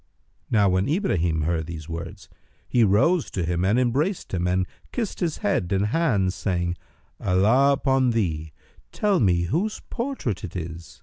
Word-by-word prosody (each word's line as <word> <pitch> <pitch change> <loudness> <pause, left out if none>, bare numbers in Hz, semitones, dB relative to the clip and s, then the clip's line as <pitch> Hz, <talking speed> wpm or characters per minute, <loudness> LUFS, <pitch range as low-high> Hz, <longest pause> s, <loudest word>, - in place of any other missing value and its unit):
Now 105 -3 +4
when 95 +3 +1
Ibrahim 90 - +1
heard 80 0 -1
these 80 -2 -7
words, 85 0 -7 0.4
he 120 - +3
rose 110 - +3
to 90 - -3
him 85 +1 -1
and 100 +5 +3
embraced 135 - 0
him 90 -1 0
and 90 +1 +1 0.3
kissed 230 -5 -3
his 165 -3 -1
head 95 -2 0
and 100 +1 +2
hands, 105 - +1
saying, 90 -3 -1 0.4
"Allah 110 +9 +4
upon 135 -2 +2
thee, 80 -9 -1 0.4
tell 205 -3 +1
me 90 -5 +3
whose 180 - -1
portrait 235 - -3
it 95 - -7
is!" 80 -3 -7
100 Hz, 160 wpm, -24 LUFS, 85-135 Hz, 0.4 s, Now